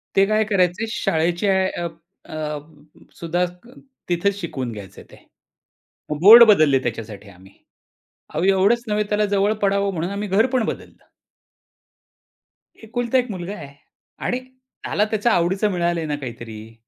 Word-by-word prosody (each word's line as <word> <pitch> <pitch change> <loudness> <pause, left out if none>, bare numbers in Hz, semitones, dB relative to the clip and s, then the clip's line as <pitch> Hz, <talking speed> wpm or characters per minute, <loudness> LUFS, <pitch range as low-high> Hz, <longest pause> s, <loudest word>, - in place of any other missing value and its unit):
ते 195 - +5
काय 215 +1 +2
करायचे 190 0 +1
शाळेचे 170 0 0
ॲ 190 0 +2
अप 165 -1 -6 0.3
अ, - - -11 0.2
ब 150 0 -18
सुद्धा 175 +2 0 0.6
तिथे 175 +3 +1
शिकवून 150 -10 -5
घ्यायचे 100 -4 -10
ते. - - -14 1.1
बोर्ड 225 +6 +10
बदलले 155 -10 +5
त्याच्यासाठी 105 -3 -6
आम्ही. 95 0 -17 0.8
अहो 155 +3 -1
एवढंच 195 +5 +3
नव्हे 210 0 0
त्याला 210 0 +1
जवळ 205 +1 +1
पडावं 200 0 +1
म्हणून 175 +2 -3
आम्ही 205 +1 -4
घर 200 +4 +3
पण 240 -3 +2
बदललं. - - -7 1.8
एकुलता 240 +3 -1
एक 250 -1 0
मुलगा 185 0 -6
आहे 145 -6 -10 0.5
आणि 250 - -1
त्याला 255 -4 -4
त्याच्या 220 +2 +1
आवडीचं 190 +5 +1
मिळालंय 175 -2 -1
ना 150 -1 -2
काहीतरी. 115 -5 -9
185 Hz, 140 wpm, -21 LUFS, 155-210 Hz, 1.8 s, बोर्ड